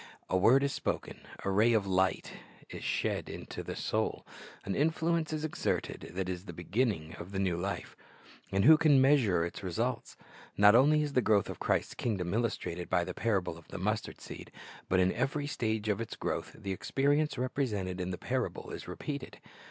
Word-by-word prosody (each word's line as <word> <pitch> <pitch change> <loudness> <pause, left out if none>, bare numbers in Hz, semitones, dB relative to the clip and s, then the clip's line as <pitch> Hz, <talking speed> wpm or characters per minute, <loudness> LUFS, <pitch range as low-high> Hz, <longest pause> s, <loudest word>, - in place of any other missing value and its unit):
A - - +3
word 120 +9 +5
is 140 - 0
spoken, - - -3 0.3
a 100 - +1
ray 110 +5 +4
of 105 -3 +2
light 95 -1 +1 0.4
is - - -7
she^. - - -1
into - - -6
the - - -6
soul, - - -1 0.4
an 100 - -1
influence 160 - +1
is 155 0 -2
exerted 155 - -2
that 95 -1 -1
is 90 +1 -4
the 85 - -7
beginning 90 -2 -1
of 90 +3 -8
the 100 - -4
new 95 -3 +1
life; 95 +4 -4 0.6
and 95 +2 +2
who 155 +2 +9
can 145 -4 +6
measure 125 - +4
its 85 - -6
results? 110 +7 -2 0.4
Not 105 0 +8
only 150 +5 +5
is 145 -1 -3
the 125 - +4
growth 105 -3 +2
of - - -9
Christ's - - 0
kingdom 95 -6 -2
illustrated 90 -7 -2
by 90 - +2
the 90 +1 -5
parable 95 -7 -1
of 85 - -19
the - - -7
mustard 105 +4 -2
seed, - - -9 0.4
but 95 - +3
in 90 0 +3
every 145 +2 -1
stage 110 -6 -1
of 105 0 0
its 115 - -5
growth - - -3
the 100 -2 -5
experience 145 +9 +1
represented 105 -8 -2
in 90 - -2
the 90 - -3
parable - - -3
is - - -7
repeated. 140 -3 -5
105 Hz, 190 wpm, -31 LUFS, 95-135 Hz, 0.6 s, who